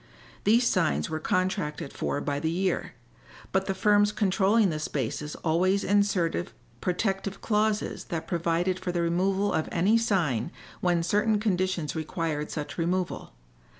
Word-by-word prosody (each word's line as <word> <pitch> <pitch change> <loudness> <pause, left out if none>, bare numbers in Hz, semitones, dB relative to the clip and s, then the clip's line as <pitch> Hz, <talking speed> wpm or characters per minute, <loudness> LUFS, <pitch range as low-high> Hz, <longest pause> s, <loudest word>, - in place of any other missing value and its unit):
These 235 +4 +4
signs 75 +1 +1
were 155 - -2
contracted 170 -4 -1
for - - -2
by 145 -1 -2
the 160 +2 -1
year, 185 +3 -1 0.6
but 190 0 +1
the 195 - -1
firms 205 +1 +4
controlling 200 +1 +3
the 155 - -3
spaces 150 0 -3
always 185 +5 +2
inserted 195 -4 +1 0.3
protective 195 +1 -1
clauses 215 -1 0
that 165 -2 -4
provided 175 +2 0
for 185 -1 -3
the 175 -1 0
removal 190 +4 +1
of 160 - -1
any 200 +7 +3
sign 170 - 0 0.3
when 175 -2 +1
certain 210 +4 +2
conditions 185 -6 0
required 155 -1 -2
such 150 +2 -5
removal. 180 - -2
185 Hz, 140 wpm, -27 LUFS, 165-200 Hz, 0.6 s, These